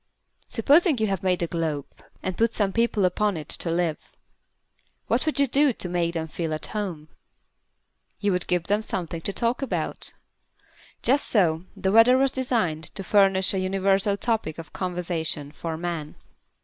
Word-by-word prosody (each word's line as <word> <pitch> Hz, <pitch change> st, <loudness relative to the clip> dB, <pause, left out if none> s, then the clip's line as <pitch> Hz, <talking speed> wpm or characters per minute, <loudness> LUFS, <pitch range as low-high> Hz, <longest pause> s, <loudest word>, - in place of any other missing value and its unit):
Supposing 290 Hz, -, +4 dB
you 220 Hz, -, +1 dB
have 195 Hz, -4 st, -1 dB
made 180 Hz, -2 st, +1 dB
a -, -, +2 dB
globe 160 Hz, -4 st, -2 dB, 0.4 s
and 185 Hz, -, -2 dB
put 230 Hz, +3 st, +1 dB
some 200 Hz, -3 st, +1 dB
people 230 Hz, -4 st, +2 dB
upon 200 Hz, +1 st, +1 dB
it 155 Hz, -, -7 dB
to 170 Hz, -, -1 dB
live. 165 Hz, -2 st, 0 dB, 1.1 s
What -, -, 0 dB
would 310 Hz, -, 0 dB
you 280 Hz, -, +5 dB
do 275 Hz, +1 st, +3 dB
to 185 Hz, -, -4 dB
make 175 Hz, -1 st, -1 dB
them 160 Hz, -1 st, -2 dB
feel 160 Hz, 0 st, -3 dB
at 155 Hz, -, -1 dB
home? 180 Hz, -8 st, -4 dB, 1.1 s
You 205 Hz, -1 st, +1 dB
would 180 Hz, -1 st, -1 dB
give 180 Hz, -1 st, +1 dB
them 205 Hz, +4 st, +1 dB
something 170 Hz, -5 st, -4 dB
to 200 Hz, -, -3 dB
talk 235 Hz, +5 st, -1 dB
about. 270 Hz, -, -3 dB, 0.9 s
Just 275 Hz, +4 st, +3 dB
so 170 Hz, -5 st, +2 dB
the 190 Hz, -, 0 dB
Weather 225 Hz, +4 st, +7 dB
was 270 Hz, 0 st, +4 dB
designed 225 Hz, -, -1 dB
to 195 Hz, -, -2 dB
furnish 195 Hz, -1 st, +3 dB
a 190 Hz, -, 0 dB
universal 195 Hz, +1 st, +1 dB
topic 220 Hz, -9 st, -1 dB
of 165 Hz, -1 st, -10 dB
conversation 170 Hz, -5 st, -3 dB
for 160 Hz, 0 st, -5 dB
Man. 165 Hz, -3 st, -4 dB
190 Hz, 170 wpm, -25 LUFS, 165-220 Hz, 1.1 s, Weather